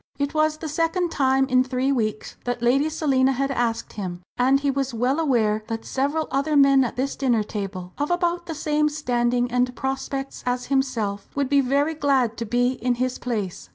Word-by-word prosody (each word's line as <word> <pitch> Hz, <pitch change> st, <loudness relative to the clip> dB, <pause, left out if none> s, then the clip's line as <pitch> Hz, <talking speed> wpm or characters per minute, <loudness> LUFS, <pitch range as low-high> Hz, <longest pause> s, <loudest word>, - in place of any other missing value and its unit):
It 285 Hz, +1 st, -1 dB
was 310 Hz, 0 st, +2 dB
the 320 Hz, -, -6 dB
second 330 Hz, +3 st, 0 dB
time 265 Hz, -1 st, +2 dB
in 255 Hz, -1 st, +4 dB
three 255 Hz, +1 st, 0 dB
weeks 215 Hz, -5 st, -2 dB
that 245 Hz, -1 st, -2 dB
Lady 275 Hz, +6 st, +3 dB
Selina 270 Hz, -4 st, +2 dB
had 275 Hz, +2 st, -1 dB
asked 235 Hz, -3 st, -1 dB
him, 180 Hz, -4 st, -5 dB
and 265 Hz, +2 st, +3 dB
he 280 Hz, 0 st, +1 dB
was 270 Hz, -2 st, -2 dB
well 255 Hz, +6 st, +1 dB
aware 220 Hz, -8 st, +1 dB
that 225 Hz, -1 st, -4 dB
several 285 Hz, +4 st, -1 dB
other 285 Hz, +2 st, +1 dB
men 275 Hz, -1 st, +6 dB
at 240 Hz, -, -3 dB
this 265 Hz, +2 st, -2 dB
dinner 245 Hz, -6 st, +1 dB
table, 195 Hz, -3 st, -6 dB
of 290 Hz, -, 0 dB
about 350 Hz, 0 st, 0 dB
the 325 Hz, -, -4 dB
same 300 Hz, 0 st, +1 dB
standing 245 Hz, -4 st, 0 dB
and 250 Hz, 0 st, +1 dB
prospects 270 Hz, 0 st, -4 dB
as 250 Hz, 0 st, -1 dB
himself, 225 Hz, -7 st, -1 dB
would 280 Hz, -2 st, 0 dB
be 280 Hz, -1 st, +4 dB
very 280 Hz, +4 st, +1 dB
glad 270 Hz, -6 st, +1 dB
to 230 Hz, -, -4 dB
be 245 Hz, +3 st, +2 dB
in 245 Hz, 0 st, +1 dB
his 255 Hz, +1 st, -2 dB
place. 200 Hz, -, -4 dB
265 Hz, 195 wpm, -23 LUFS, 240-285 Hz, -, men